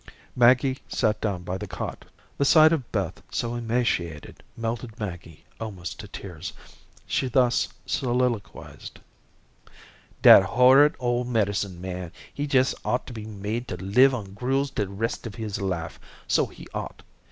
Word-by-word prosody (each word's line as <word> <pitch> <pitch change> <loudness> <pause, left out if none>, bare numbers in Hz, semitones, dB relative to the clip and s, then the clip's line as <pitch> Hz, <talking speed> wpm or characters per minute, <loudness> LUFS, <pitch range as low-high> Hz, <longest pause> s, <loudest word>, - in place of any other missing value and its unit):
Maggie 130 +2 +4
sat 105 -1 0
down 95 -5 -2
by 90 +2 -4
the 105 - -6
cot. - - -6 0.3
The - - +3
sight 155 +3 +7
of 135 -7 -3
Beth - - -2
so 120 0 -2
emaciated 115 -10 -2 0.2
melted 115 0 -4
Maggie 85 -6 -7
almost 95 -4 -6
to 105 - -8
tears. 90 -4 -8 0.5
She 130 - 0
thus 125 -1 +2 0.2
soliloquized: 120 -5 -2 1.3
"Dat - - +10
horrid 130 +8 +5
ole 120 0 0
medicine 100 -6 -1
man, 90 -2 -5 0.2
he 145 - -3
jes' 130 0 +4
ought 125 - -1
to 125 - -9
be 110 -2 -7
made 110 +3 -4
to 90 - -4
live 125 +9 +4
on 100 -5 -7
gruels 135 +5 -1
de 105 - -2
rest 115 +5 -3
of 105 - -9
his 105 -2 -4
life, 90 -4 -3 0.3
so - - +2
he - - -13
ought. - - -6
115 Hz, 150 wpm, -25 LUFS, 95-125 Hz, 1.3 s, Dat